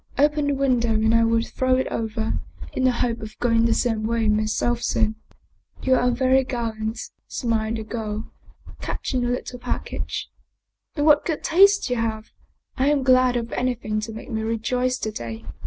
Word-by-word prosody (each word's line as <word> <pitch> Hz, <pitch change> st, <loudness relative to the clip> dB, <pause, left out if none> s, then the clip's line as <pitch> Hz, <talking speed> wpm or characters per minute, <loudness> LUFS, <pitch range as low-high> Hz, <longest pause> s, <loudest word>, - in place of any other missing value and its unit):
Open 295 Hz, +1 st, +3 dB
the 285 Hz, -, +1 dB
window 250 Hz, -4 st, +2 dB
and 220 Hz, +1 st, +2 dB
I 230 Hz, 0 st, +5 dB
will 230 Hz, 0 st, +2 dB
throw 255 Hz, +1 st, +1 dB
it 260 Hz, -, +1 dB
over, 220 Hz, 0 st, -2 dB, 0.3 s
in 260 Hz, -, 0 dB
the 255 Hz, -, +5 dB
hope 235 Hz, -1 st, -1 dB
of 215 Hz, 0 st, -8 dB
going 230 Hz, -1 st, +2 dB
the 230 Hz, -, +3 dB
same 225 Hz, -3 st, 0 dB
way 230 Hz, -1 st, +1 dB
myself 215 Hz, +3 st, +1 dB
soon." 220 Hz, -2 st, +1 dB, 0.4 s
" -, -, -25 dB
You 260 Hz, -, +3 dB
are 250 Hz, -1 st, +3 dB
very 260 Hz, +2 st, +3 dB
gallant," 225 Hz, -3 st, -3 dB, 0.3 s
smiled 225 Hz, -2 st, -1 dB
the 220 Hz, -, -4 dB
girl, 215 Hz, -1 st, -5 dB, 0.5 s
catching 255 Hz, -2 st, -2 dB
the 245 Hz, -, 0 dB
lit 245 Hz, -, -2 dB
tle 250 Hz, -, -7 dB
package. -, -, -4 dB, 0.3 s
" -, -, -54 dB
And 290 Hz, -2 st, 0 dB
what 300 Hz, -1 st, +6 dB
good 320 Hz, -3 st, -3 dB
taste 395 Hz, +4 st, +5 dB
you 245 Hz, -, +1 dB
have! 220 Hz, -1 st, -3 dB, 0.5 s
I 265 Hz, -, +2 dB
am 290 Hz, -2 st, +2 dB
glad 255 Hz, -1 st, +4 dB
of 235 Hz, -1 st, -2 dB
anything 245 Hz, -4 st, -1 dB
to 215 Hz, +1 st, -5 dB
make 225 Hz, +4 st, -9 dB
me 220 Hz, -1 st, -1 dB
rejoice 250 Hz, +3 st, 0 dB
to 215 Hz, -, -3 dB
day. 115 Hz, -, -7 dB
235 Hz, 190 wpm, -23 LUFS, 220-255 Hz, 0.5 s, what